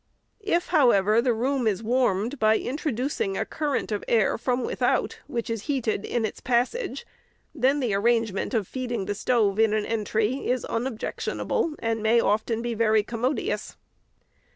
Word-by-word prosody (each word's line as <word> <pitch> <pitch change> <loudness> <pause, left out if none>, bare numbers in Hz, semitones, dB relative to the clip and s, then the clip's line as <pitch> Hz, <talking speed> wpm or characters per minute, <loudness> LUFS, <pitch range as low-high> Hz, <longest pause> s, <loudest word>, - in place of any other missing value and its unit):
If, 350 -3 +1
however, 230 - +4
the 250 0 +2
room 250 +2 0
is 215 0 0
warmed 240 +1 +1
by 220 0 +4
introducing 255 -7 -2
a - - -1
current 295 -6 -2
of 210 - -2
air 220 -4 +3
from 250 +1 -1
without, - - 0
which 240 -6 -3
is 225 -2 -4
heated 240 -8 -1
in 235 -2 -1
its - - -5
passage, 260 - -1 0.5
then 275 0 +2
the 245 -7 0
arrangement 225 +1 +1
of 210 -5 0
feeding 245 -6 -3
the 205 - -2
stove 210 -2 +1
in 220 -1 +4
an 215 -1 0
entry 220 +3 -1
is 250 0 0
unobjectionable, 250 +6 -2
and 225 -1 -2
may, 220 +2 +4
often, 220 +2 0
be 240 -1 -2
very 220 -1 +3
commodious. 240 +6 -2
230 Hz, 155 wpm, -25 LUFS, 215-255 Hz, 0.5 s, however